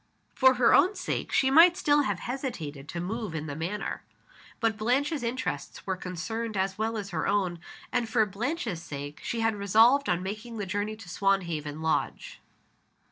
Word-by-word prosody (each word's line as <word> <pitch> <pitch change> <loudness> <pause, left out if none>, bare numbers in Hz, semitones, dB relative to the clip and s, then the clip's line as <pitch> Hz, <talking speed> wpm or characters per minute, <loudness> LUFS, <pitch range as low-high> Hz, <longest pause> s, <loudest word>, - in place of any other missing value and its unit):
For 260 -1 +5
her 245 -1 +4
own 375 +4 +5
sake - - -3
she 265 -1 +3
might 340 +5 +7
still 295 -4 +3
have 205 -9 -1
hesitated 160 - -5
to 170 - -4
move 200 0 -4
in 155 -1 -3
the 145 -2 -5
matter. 175 +7 -3 0.6
But 225 -1 +1
Blanche's 270 +7 0
interests 235 - -4
were 190 - -1
concerned 190 +5 -4
as 190 0 0
well 220 +2 -1
as 200 -2 -5
her 160 - -1
own; 190 -4 0 0.3
and, 240 -3 0
for 220 -1 +3
Blanche's 220 - -3
sake, 145 -2 -7
she 230 - -3
had 225 0 +2
resolved 225 +7 +4
on 180 0 +1
making 215 +4 -6
the 205 - -3
journey 205 +3 -2
to 220 -3 -13
Swanhaven 170 -6 -1
Lodge. 160 - -2
210 Hz, 175 wpm, -28 LUFS, 175-240 Hz, 0.6 s, might